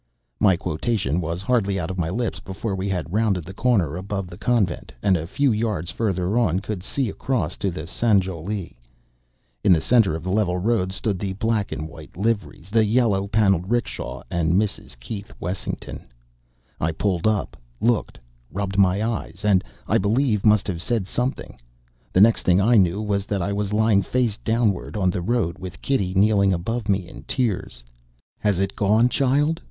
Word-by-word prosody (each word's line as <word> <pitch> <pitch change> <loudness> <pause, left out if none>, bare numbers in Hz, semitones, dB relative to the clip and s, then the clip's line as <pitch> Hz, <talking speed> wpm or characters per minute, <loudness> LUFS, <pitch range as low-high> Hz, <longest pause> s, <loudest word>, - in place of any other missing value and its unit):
'" - - -50
My 95 - +3
quotation 85 - -1
was 85 +3 -3
hardly 100 -4 +1
out 85 +1 -3
of 95 - -5
my 80 -1 0
lips 115 +6 -2
before 95 +2 -5
we 95 +1 -2
had 90 -2 -3
rounded 105 -5 +1
the 95 - -8
corner 95 - +1
above 95 0 -4
the 85 - -9
Convent; 115 -7 0
and 95 - +4
a 80 -2 -3
few 140 +8 +2
yards 105 -7 -1
further 100 0 0
on 95 -6 +2
could 100 -1 -5
see 130 +6 -1
across 100 - -2
to 100 - -1 0.2
Sanjowlie. 95 -2 -1 0.9
In 100 - +5
the 85 - +6
centre 110 -3 +3
of 80 - -6
the 90 - -2
level 95 -3 +1
road 95 -1 +1
stood 100 0 -1
the 95 -1 -2
black 110 0 -1
and 75 - -4
white 80 - -13
liveries, 100 -4 -2
the 110 0 +4
yellow 105 -3 +2
paneled 95 -4 +2
'rickshaw, 120 0 -2
and 85 -1 +1
Mrs. 90 - -1
Keith 100 - -7
Wessington. 90 +1 -5 0.7
I 80 +1 0
pulled 90 +2 0
up, 110 -2 0 0.2
looked, 115 -1 +1 0.3
rubbed 100 +1 -2
my 100 +2 +3
eyes, 105 -3 -4
and, 100 -3 +4 0.2
I - - +3
believe 110 +1 +1
must 105 -2 +4
have 85 -4 -3
said 110 -1 -1
something. 125 - -3 0.5
The 95 - +4
next 115 +2 +5
thing 90 +1 +3
I 115 +5 +4
knew 100 0 +3
was 100 -1 -1
that 100 -4 -1
I 100 - -1
was 100 0 -2
lying 110 -1 +3
face 115 +2 0
downward 110 -3 0
on 95 -3 +2
the 90 - -3
road 95 -5 0
with 90 -1 -8
Kitty 100 -9 -1
kneeling 100 -1 +4
above 105 +5 -3
me 95 -3 +1
in 90 - -11
tears. 100 - -1 0.6
"Has 105 -3 +1
it 95 0 -1
gone, 110 +4 +4
child!" 145 +5 +1
100 Hz, 180 wpm, -23 LUFS, 90-110 Hz, 0.9 s, the